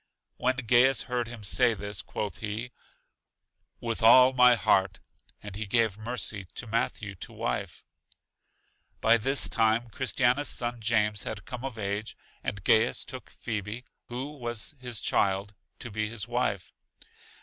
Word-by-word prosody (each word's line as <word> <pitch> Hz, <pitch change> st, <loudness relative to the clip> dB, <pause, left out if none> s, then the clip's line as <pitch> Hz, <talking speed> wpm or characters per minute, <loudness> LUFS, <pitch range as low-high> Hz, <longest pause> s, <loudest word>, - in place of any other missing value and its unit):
When 130 Hz, +1 st, +1 dB
Gaius 125 Hz, 0 st, +4 dB
heard 125 Hz, -1 st, -2 dB
him 120 Hz, -3 st, -9 dB
say 120 Hz, +3 st, +2 dB
this, 100 Hz, 0 st, -4 dB
quoth 105 Hz, -2 st, -5 dB
he: 110 Hz, +3 st, -4 dB, 1.1 s
With 115 Hz, -1 st, -3 dB
all 125 Hz, +3 st, +8 dB
my 125 Hz, -1 st, +6 dB
heart. 95 Hz, -4 st, +2 dB, 0.4 s
And 105 Hz, -2 st, -7 dB
he 105 Hz, +1 st, -4 dB
gave 110 Hz, -1 st, +2 dB
Mercy 110 Hz, -3 st, -3 dB
to -, -, -4 dB
Matthew 110 Hz, -2 st, -2 dB
to -, -, -8 dB
wife. -, -, -4 dB, 1.1 s
By 115 Hz, +1 st, +5 dB
this 135 Hz, +5 st, +4 dB
time 115 Hz, +1 st, +1 dB
Christiana's 130 Hz, +2 st, +1 dB
son 120 Hz, -1 st, -2 dB
James 105 Hz, -2 st, +1 dB
had 105 Hz, -2 st, -5 dB
come 125 Hz, 0 st, -7 dB
of 135 Hz, -4 st, -5 dB
age, 100 Hz, +1 st, -3 dB, 0.3 s
and 100 Hz, -2 st, -4 dB
Gaius 110 Hz, +3 st, +3 dB
gave 130 Hz, -, -6 dB
Phebe 110 Hz, +2 st, -5 dB, 0.2 s
(who 135 Hz, +5 st, -6 dB
was 120 Hz, +3 st, -3 dB
his 125 Hz, -4 st, -4 dB
child) 100 Hz, +1 st, +1 dB, 0.2 s
to 120 Hz, -, -7 dB
be 110 Hz, 0 st, -2 dB
his 110 Hz, -1 st, -4 dB
wife. 120 Hz, -6 st, -1 dB
115 Hz, 145 wpm, -28 LUFS, 105-125 Hz, 1.1 s, all